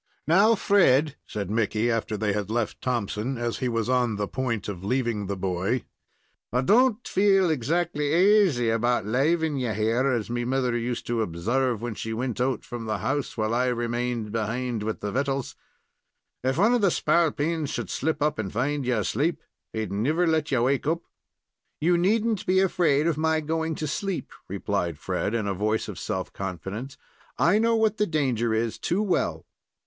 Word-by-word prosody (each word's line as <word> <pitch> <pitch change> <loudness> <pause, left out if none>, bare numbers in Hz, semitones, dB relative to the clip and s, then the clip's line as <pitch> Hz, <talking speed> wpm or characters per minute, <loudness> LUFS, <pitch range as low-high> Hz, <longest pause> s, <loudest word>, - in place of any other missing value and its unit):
"Now, 200 +8 +5
Fred," 155 -9 +3
said 100 -2 -4
Mickey, 110 +1 +1
after 110 -1 -1
they 105 -1 0
had 105 -1 -2
left 115 -1 -2
Thompson, 120 +1 -2
as 120 -1 -2
he 125 - 0
was 115 -1 -1
on 125 -3 +1
the 105 0 -2
point 115 -4 -2
of 95 -3 -6
leaving 115 -3 -1
the 100 0 -3
boy, 95 +6 -1 0.7
"I 125 +2 +2
don't 240 - +3
feel 195 -3 +3
exactly 150 +2 0
aisy 170 - +4
'bout 120 -2 +1
laving 150 +6 +1
you 125 -4 -1
here, 115 +5 +1
as 120 -5 0
me 120 +1 -2
mother 125 -1 0
used 120 0 -2
to 115 -1 -1
observe 115 +6 -1
when 120 -2 -3
she 110 +1 -5
wint 125 +1 -2
out 130 -2 0
from 120 -2 -6
the 110 -1 -1
house, 135 +9 -2
while 110 0 0
I 125 +2 +2
remained 120 -2 -2
behind 115 +1 -2
with 110 +1 -3
the 105 - -3
vittles. 135 0 -2 0.9
If 130 +2 0
one 215 +7 +4
of 245 - +2
the 200 - +4
spalpeens 160 -2 +1
should 120 -8 -4
slip 155 +1 -1
up 150 -6 0
and 100 -4 -3
find 140 +5 -1
you 125 -2 +2
asleep, 140 - -1 0.3
he'd 110 -3 -3
never 145 - +1
let 160 -2 +1
you 125 -3 +2
wake 135 +2 +1
up." 170 +2 0 0.8
"You 175 +3 +3
need 205 +6 +2
n't 220 -4 -1
be 185 +1 +4
afraid 165 -6 +2
of 165 -3 0
my 160 0 +2
going 160 +1 -2
to 155 - -3
sleep," 190 +5 -3 0.2
replied 95 -4 -2
Fred, 95 +6 -2
in 110 -3 -1
a 100 - 0
voice 105 +3 -1
of - - -7
self - - -4
confidence. 95 +8 -5 0.4
"I 195 +5 +4
know 230 +1 +3
what 220 -1 +2
the 210 - +1
danger 130 -8 0
is 110 0 -1
too 190 +5 0
well." 195 - -1
125 Hz, 185 wpm, -26 LUFS, 110-160 Hz, 0.9 s, Now